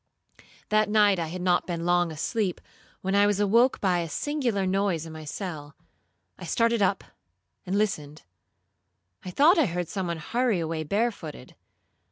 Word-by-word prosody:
That 215 0 +2
night, 205 -3 +4
I 165 - -2
had 180 +2 -6
not 180 -1 +2
been 170 -2 -3
long 175 -1 +2
asleep, 180 +5 -2 0.4
when 190 +1 -2
I 200 0 +5
was 205 -1 +1
awoke 230 +5 +3
by 180 -3 +1
a 170 -1 -3
singular 245 - -1
noise 185 -4 0
in 160 - -9
my 155 -1 -9
cell: 150 -3 -6 0.6
I - - -9
started 230 +5 +1
up, 195 0 +1 0.6
and 190 +2 0
listened. 155 -8 -2 1.0
I 185 - -6
thought 305 - +5
I 305 - +4
heard 175 -1 -3
some 190 -3 -3
one 170 -1 -2
hurry 230 +4 0
away 160 -1 -2
barefooted. 200 - -3
185 Hz, 165 wpm, -26 LUFS, 165-210 Hz, 1.0 s, I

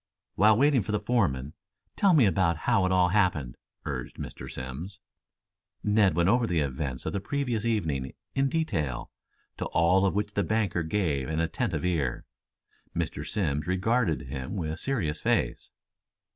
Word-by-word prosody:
"While 105 +2 +5
waiting 140 -1 +4
for 100 - -4
the 105 - +1
foreman, 90 - 0 0.4
tell 195 -4 +4
me 135 -7 +6
about 85 -3 +2
how 95 -1 +3
it - - -1
all 90 -1 +4
happened?" 90 - +1 0.3
urged 65 -4 -5
Mr. - - -7
Simms. 65 +10 -7 0.8
Ned 105 -5 +3
went 85 +1 +3
over 120 +3 +3
the 85 -5 +1
events 65 -2 -3
of - - -2
the 100 - 0
previous 120 0 -2
evening, 80 - -1 0.2
in 135 0 +2
detail, 80 - -2 0.5
to - - -3
all 90 +4 +3
of 95 - -1
which 105 0 -1
the 100 - +1
banker 100 -2 0
gave 80 -5 -1
an 80 0 -1
attentive 85 +2 -1
ear. 75 -9 -1 0.7
Mr. 80 -3 -2
Simms 75 -5 -1
regarded 95 -1 +1
him 65 +8 -5
with 80 -3 -3
serious 90 - -2
face. - - 0
90 Hz, 160 wpm, -28 LUFS, 75-105 Hz, 0.8 s, me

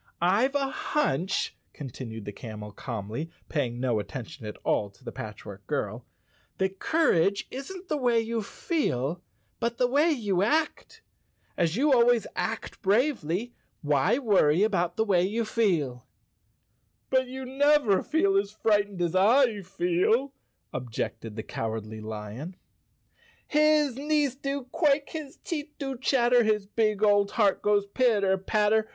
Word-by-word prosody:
"Tve 210 +11 +2
a 275 -1 +1
hunch," 190 - -1 0.2
continued 115 -6 -7
the 105 - -5
camel 105 -1 -8
calmly, 115 +7 -5 0.2
paying 125 -6 -1
no 125 -4 +1
attention 125 +2 -7
at 105 - -7
all 105 - +1
to 100 +6 -24
the 120 - -6
Patchwork 100 -2 -9
Girl, - - -3 0.5
"that 190 0 -1
courage 200 - +2
isn't 360 +8 -7
the 305 - -1
way 245 -4 +2
you 225 0 -2
feel, 180 - -2 0.4
but 235 0 -1
the 250 - +3
way 285 +7 +3
you 210 - 0
act. 300 +9 -1 0.5
As 170 -1 +1
you 285 +5 +3
al¬ 240 -2 +5
ways 240 -3 +3
act 225 0 -4
bravely, 225 - +1 0.3
why 150 - +2
worry 195 - +3
about 175 -5 0
the 220 - +2
way 190 -5 +3
you 215 +5 0
feel?" 160 - 0 1.0
"But 260 -1 +3
you 260 +1 -6
never 275 -5 +3
felt 200 -11 +2
as 200 0 -3
frightened 205 -3 0
as 170 -1 0
I 220 +2 +4
feel," 190 +8 +1 0.4
ob¬ 125 -1 -5
jected 110 -1 -4
the 110 - -5
Cowardly 110 -1 -5
Lion. 110 - -7 0.5
" - - -33
His 300 -3 +3
knees 295 -2 +1
do 275 0 -4
quake, 290 -3 +2
His 305 -2 -7
teeth 300 -2 -5
do 270 -2 -4
chatter, 245 -1 +3
His 215 -2 +1
big 215 0 0
old 205 -1 +4
heart 205 -4 +2
goes 205 -1 +2
pitter 200 -3 +2
patter! 215 +2 +2
205 Hz, 145 wpm, -27 LUFS, -, 1.0 s, al¬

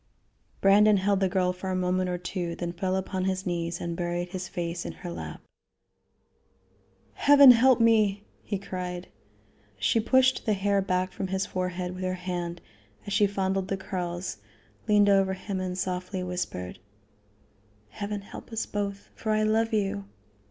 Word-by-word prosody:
Brandon 205 +1 +6
held 195 +1 +2
the 190 -1 +2
girl 180 -1 +1
for 185 +1 -6
a 185 - -1
moment 185 0 0
or 180 - -1
two, 175 -1 -4
then 175 0 -4
fell 185 +2 -1
upon 190 0 -2
his 190 0 -1
knees 170 -1 -2
and 170 -1 -3
buried 175 0 -2
his 185 0 -5
face 170 0 -4
in - - -5
her 180 -1 -8
lap. - - -7 1.7
"Heaven 280 -2 +8
help 250 +1 +5
me!" 215 -3 +3 0.2
he 205 - -3
cried. 180 -2 -5 0.7
She 230 - +2
pushed 260 +3 +3
the 215 - +4
hair 200 0 +1
back 185 -1 0
from 190 - -4
his 190 +1 -1
forehead 180 0 -3
with 185 0 -6
her 185 0 -1
hand 175 -1 -4 0.4
and - - -28
as - - -2
she 205 -1 +4
fondled 195 -1 -1
the 195 - -2
curls, 180 -2 -4 0.5
leaned 205 -1 +5
over 195 -1 +4
him 190 +1 -4
and 185 -1 -3
softly 185 0 -3
whispered: 180 - -4 1.1
"Heaven 205 - -4
help 200 - -11
us 225 - -2
both; 200 -1 -4
for 220 - -3
I 215 0 +2
love 225 +2 +2
you!" 195 - -1
190 Hz, 165 wpm, -27 LUFS, 180-205 Hz, 1.7 s, Heaven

